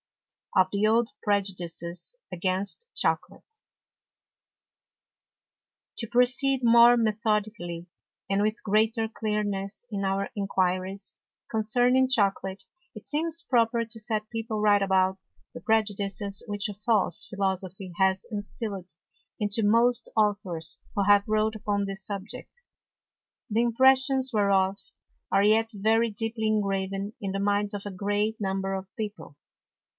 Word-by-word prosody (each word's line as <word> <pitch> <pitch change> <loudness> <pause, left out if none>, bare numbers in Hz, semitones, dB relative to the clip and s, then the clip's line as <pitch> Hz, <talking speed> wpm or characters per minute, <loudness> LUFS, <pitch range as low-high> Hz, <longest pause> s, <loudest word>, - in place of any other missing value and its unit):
Of 185 0 +5
the 200 +1 +1
old 225 +2 +3
Prejudices 180 - -1
against 190 - -1
Chocolate. 445 -1 -2 2.4
To 230 - -4
proceed 255 +3 +3
more 235 +1 +7
methodically, 210 -6 -1 0.4
and 195 +1 +1
with 215 +2 -1
greater 220 +2 +1
Clearness 210 -1 -3
in 200 -1 -3
our 195 +1 -1
Enquiries 190 -1 -2 0.3
concerning 245 +4 +2
Chocolate, 195 -4 0 0.3
it 215 - -10
seems 325 +2 +1
proper 235 -3 +1
to 225 0 -6
set 215 0 -2
People 225 -1 -4
right 205 -1 +4
about 190 -1 +2 0.3
the 165 - -9
Prejudices 200 -2 0
which 205 0 -1
a 205 - -5
false 205 -4 +2
Philosophy 190 -2 -3
has 190 -1 +2
instilled 205 -4 -5 0.5
into 210 +1 +1
most 235 +3 +3
Authors 195 -6 0 0.2
who 200 - +1
have 205 0 +4
wrote 215 0 +1
upon 205 -1 -1
this 195 -1 -3
Subject; 220 - -6 0.9
the 225 +2 +1
Impressions 265 +2 +3
whereof, 200 -2 +2 0.5
are 195 +1 +3
yet 220 +2 +3
very 220 +3 +2
deeply 220 +1 -2
ingraven 195 -1 -1
in 195 -2 -3
the 195 - -3
Minds 205 +1 0
of 205 0 -5
a 205 - -5
great 205 +3 -2
Number 195 0 -2
of 190 0 -6
People. 210 -9 -6
205 Hz, 120 wpm, -27 LUFS, 195-225 Hz, 2.4 s, more